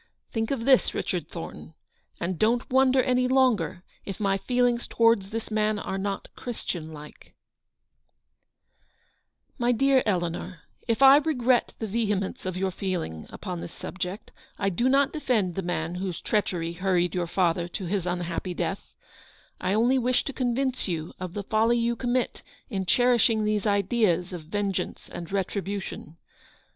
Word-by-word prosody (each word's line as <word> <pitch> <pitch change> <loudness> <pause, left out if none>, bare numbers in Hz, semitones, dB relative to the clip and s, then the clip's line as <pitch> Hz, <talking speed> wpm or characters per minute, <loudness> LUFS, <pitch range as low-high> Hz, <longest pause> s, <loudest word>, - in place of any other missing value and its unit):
Think 225 -1 -1
of 250 -5 -2
this, 265 -1 +4
Richard - - -2
Thornton, - - -8 0.4
and 175 0 -2
don't 235 +3 +2
wonder 260 0 +4
any 250 -1 +2
longer 230 -9 +2 0.2
if 195 - -6
my 195 -2 +2
feelings 245 +1 +1
towards 230 -4 +3
this 225 +1 -5
man 215 0 +1
are 195 -1 -3
not 195 0 -3
Christian 175 -9 -5
like" 150 -1 -12 2.1
ft - - -37
My 240 0 +3
dear 270 +2 +4
Eleanor, 175 -3 -2 0.3
if 230 +3 +2
I 270 +1 +10
regret 260 -5 +2
the 225 - -3
vehemence 205 -3 -1
of 185 -1 -3
your 190 0 0
feeling 175 - -4
upon 180 -4 -6
this - - -7
subject, 185 +2 -6 0.3
I 200 - +1
do 235 +8 +1
not 275 +1 +3
defend 225 - 0
the 195 - -2
man 170 -2 -2
whose 180 -1 -3
treachery 175 -6 -1
hurried 180 -1 +1
your 175 -1 -1
father 170 -1 +1
to 185 +2 -5
his 185 0 -1
unhappy 175 0 -2
death; 195 - -4 0.6
I 185 +2 0
only 245 +4 +3
wish 250 0 +2
to 280 - -4
convince 255 0 0
you 165 -3 -3
of 185 -1 -6
the 205 - -3
folly 225 +4 +2
you 235 0 +1
commit 245 +1 -1 0.3
in 190 -3 -2
cherishing 240 -2 +4
these 210 -1 0
ideas 200 -3 +2
of 170 -3 -7
vengeance 200 +2 -3
and 170 0 -7
retribution. 195 -3 -3
200 Hz, 155 wpm, -27 LUFS, 180-240 Hz, 2.1 s, I